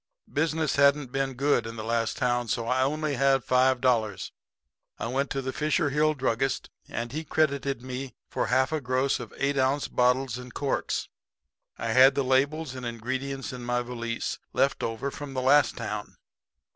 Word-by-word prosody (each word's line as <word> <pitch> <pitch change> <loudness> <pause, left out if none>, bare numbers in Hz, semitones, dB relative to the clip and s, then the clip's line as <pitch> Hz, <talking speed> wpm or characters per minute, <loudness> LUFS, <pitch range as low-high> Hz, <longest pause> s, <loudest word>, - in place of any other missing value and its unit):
"Business 160 0 0
hadn't 140 -2 +4
been 135 0 -1
good 130 -3 +2
in 115 - -7
the 110 - -5
last 115 0 -1
town, 120 -2 +1
so 115 +1 -1
I 130 +2 +2
only 150 +2 0
had 135 -1 +3
five 130 0 +3
dollars. 115 -6 +1 0.7
I - - -4
went 135 +4 -1
to 135 - -2
the 130 0 -3
Fisher 155 +1 +1
Hill 155 +2 +2
druggist 130 0 -1 0.2
and 115 0 -4
he 155 +4 -3
credited 140 -4 0
me 130 +1 -6
for - - -2
half 130 +2 +2
a 155 -1 -1
gross 130 +2 +1
of 120 -3 -8
eight 140 0 0
ounce 135 +2 +1
bottles 125 0 +1
and 125 -1 -11
corks. 140 -1 -1 0.7
I 115 - -3
had 130 +4 +6
the 140 - +1
labels 140 +3 +1
and 130 -1 -7
ingredients 130 +4 -4
in 125 -1 -7
my 120 0 0
valise, 115 -1 -4
left - - +2
over 115 +5 -2
from 145 -1 -7
the 130 - 0
last 145 +3 +4
town. 105 -3 -5
130 Hz, 180 wpm, -27 LUFS, 120-140 Hz, 0.7 s, had